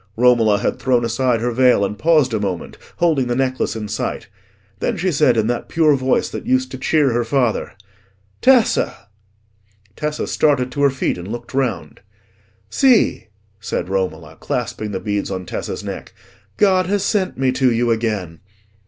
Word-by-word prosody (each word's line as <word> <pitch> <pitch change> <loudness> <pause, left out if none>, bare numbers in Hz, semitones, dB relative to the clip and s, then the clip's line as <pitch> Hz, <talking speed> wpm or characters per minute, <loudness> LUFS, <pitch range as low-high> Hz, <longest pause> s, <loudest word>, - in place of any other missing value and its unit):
Romola 115 -4 +4
had - - -2
thrown 125 -2 +1
aside 120 0 0
her 120 +1 0
veil 125 -4 +3
and 105 +1 -5
paused 155 -6 +3
a 110 - 0
moment, 95 -4 -4 0.2
holding 155 -7 +1
the 120 - -1
necklace 130 -2 -1
in 110 -1 -5
sight. - - -4 0.5
Then - - -1
she 185 +2 0
said, 140 -6 +3
in 110 - +2
that 120 +1 -2
pure 155 -3 +3
voice 130 -1 +1
that - - -7
used 260 +1 +1
to - - -7
cheer 145 -6 +2
her 120 +1 +1
father— 120 -1 0 0.7
"Tessa!" 230 - +2 0.9
Tessa 150 0 -3
started 130 -4 +1
to 145 - -3
her 140 - +5
feet 130 -8 -2
and 90 - -8
looked 120 +4 -7
round. 125 -9 -2 0.7
"See," 255 - +3 0.3
said 95 - -4
Romola, 95 -1 -3
clasping 110 - -3
the 95 -2 -3
beads 105 -1 -2
on 95 -1 -4
Tessa's - - -5
neck, - - -7 0.4
"God 185 -3 +3
has 200 0 0
sent 200 -2 0
me 130 0 +1
to 130 -1 +2
you 120 +1 +1
again." 105 -8 -2
125 Hz, 170 wpm, -19 LUFS, 110-150 Hz, 0.9 s, her